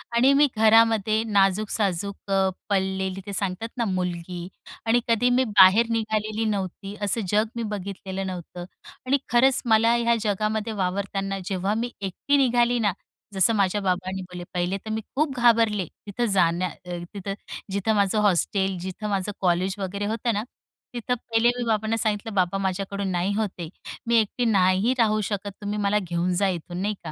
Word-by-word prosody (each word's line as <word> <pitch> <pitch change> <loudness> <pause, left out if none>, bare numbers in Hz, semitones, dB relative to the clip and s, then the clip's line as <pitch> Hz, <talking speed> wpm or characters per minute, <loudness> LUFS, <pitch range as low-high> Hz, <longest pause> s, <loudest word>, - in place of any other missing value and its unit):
आणि 255 +4 +5
मी 290 +1 +5
घरामध्ये 220 -1 +4
नाजूक-साजूक 200 -1 0
अ, 190 -1 +3 0.2
पडलेली 190 -1 -1
ते 200 - -6
सांगतात 195 +3 -3
ना, 235 - 0
मुलगी 180 -2 -3 0.4
आणि 230 +2 +4
कधी 230 +1 +3
मी 250 +1 +3
बाहेर 205 +2 +6
निघालेली 215 -1 -1
नव्हती. 195 0 -4
असं 205 +3 0
जग 210 +1 +3
मी 235 - -2
बघितलेलं 195 -1 -5
नव्हतं 175 -1 -7 0.4
आणि 275 +2 +3
खरंच 245 +3 +4
मला 225 +1 +4
ह्या 235 0 +2
जगामध्ये 215 +1 -1
वावरताना 195 0 -2
जेव्हा 195 +1 -1
मी 240 +1 -2
एकटी 200 +9 0
निघाली 245 -2 +3
ना, 210 -3 +2 0.4
जसं 195 +4 +3
माझे 200 0 +1
बाबांनी 185 0 -1
बोलले. 180 -1 -8
पहिले 180 +2 -1
तर 220 - -6
मी 220 0 -2
खूप 285 -2 0
घाबरले. 230 -5 +3 0.2
तिथं 220 +4 -1
जाण्या 175 0 +2
अ, 175 +2 -8 0.2
तिथं 195 -1 -4 0.4
जिथं 200 +3 0
माझं 200 +1 +2
हॉस्टेल, 190 0 +1
जिथं 190 +4 -5
माझं 200 +1 -1
कॉलेज 185 +1 +1
वगैरे 200 +1 -3
होतं 225 +2 -1
ना, 210 +2 -1 0.5
तिथं 245 +1 -1
पहिले 230 0 +1
मी 245 - -2
बाबांना 220 0 +1
सांगितलं, 215 -1 -2
"बाबा, 185 0 +1
माझ्याकडून 195 +1 -2
नाही 180 +3 0
होत 215 -2 0
हे, 170 - -4 0.4
मी 235 - +3
एकटी 225 +2 +2
नाही 195 +2 +3
राहू 215 -2 +3
शकत, 205 -1 -3
तुम्ही 205 0 -3
मला 205 +1 +2
घेऊन 180 -1 -1
जा 200 - +4
इथून." 175 0 -4
नाही 210 +2 0
का? 160 - -6
205 Hz, 170 wpm, -25 LUFS, 190-225 Hz, 0.5 s, बाहेर